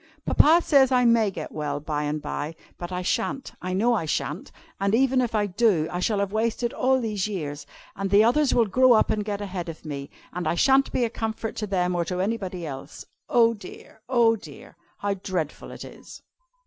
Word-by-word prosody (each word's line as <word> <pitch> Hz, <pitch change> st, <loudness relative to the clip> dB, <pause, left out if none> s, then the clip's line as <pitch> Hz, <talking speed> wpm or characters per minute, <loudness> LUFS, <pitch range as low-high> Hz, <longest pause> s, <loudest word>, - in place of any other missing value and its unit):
Papa 330 Hz, +3 st, +5 dB
says 275 Hz, -3 st, +5 dB
I 250 Hz, -1 st, +4 dB
may 230 Hz, -3 st, +4 dB
get 195 Hz, -, -7 dB
well 145 Hz, -2 st, -3 dB
by 150 Hz, 0 st, -3 dB
and 150 Hz, +1 st, -2 dB
by, 150 Hz, +3 st, -4 dB, 0.2 s
but 175 Hz, +1 st, -6 dB
I 180 Hz, 0 st, -3 dB
sha'n't, 235 Hz, +7 st, -2 dB
I 185 Hz, +1 st, -3 dB
know 230 Hz, +6 st, +2 dB
I 210 Hz, -8 st, 0 dB
sha'n't. 150 Hz, +2 st, -3 dB, 0.3 s
And 200 Hz, +2 st, +2 dB
even 260 Hz, +1 st, +3 dB
if 240 Hz, -3 st, -2 dB
I 210 Hz, -1 st, +2 dB
do, 195 Hz, -5 st, +2 dB
I 175 Hz, -, -3 dB
shall 210 Hz, +3 st, 0 dB
have 200 Hz, -1 st, -1 dB
wasted 230 Hz, +2 st, -1 dB
all 260 Hz, +1 st, +2 dB
these 215 Hz, -4 st, -2 dB
years, 150 Hz, -8 st, -5 dB, 0.3 s
and 195 Hz, 0 st, -3 dB
the 205 Hz, +2 st, +6 dB
others 260 Hz, +5 st, +3 dB
will 235 Hz, -, +4 dB
grow 255 Hz, +4 st, +5 dB
up 220 Hz, -, +3 dB
and 210 Hz, -, 0 dB
get 205 Hz, -1 st, -4 dB
ahead 185 Hz, -4 st, -5 dB
of 165 Hz, 0 st, -10 dB
me, 140 Hz, -2 st, -6 dB, 0.2 s
and 180 Hz, +1 st, -3 dB
I -, -, +1 dB
sha'n't 270 Hz, +7 st, +3 dB
be 245 Hz, -, +1 dB
a -, -, -2 dB
comfort 225 Hz, 0 st, -4 dB
to 210 Hz, -, -3 dB
them 180 Hz, -2 st, 0 dB
or 175 Hz, -1 st, 0 dB
to 180 Hz, +1 st, -3 dB
anybody 190 Hz, -4 st, -2 dB
else. 135 Hz, -3 st, -8 dB, 0.2 s
Oh 230 Hz, -3 st, +4 dB
dear! 210 Hz, +1 st, -12 dB
oh 235 Hz, -3 st, +4 dB
dear! 155 Hz, -9 st, -13 dB, 0.2 s
how 205 Hz, 0 st, -1 dB
dreadful 185 Hz, -5 st, -4 dB
it -, -, -9 dB
is!" -, -, -13 dB
205 Hz, 210 wpm, -25 LUFS, 175-235 Hz, 0.3 s, the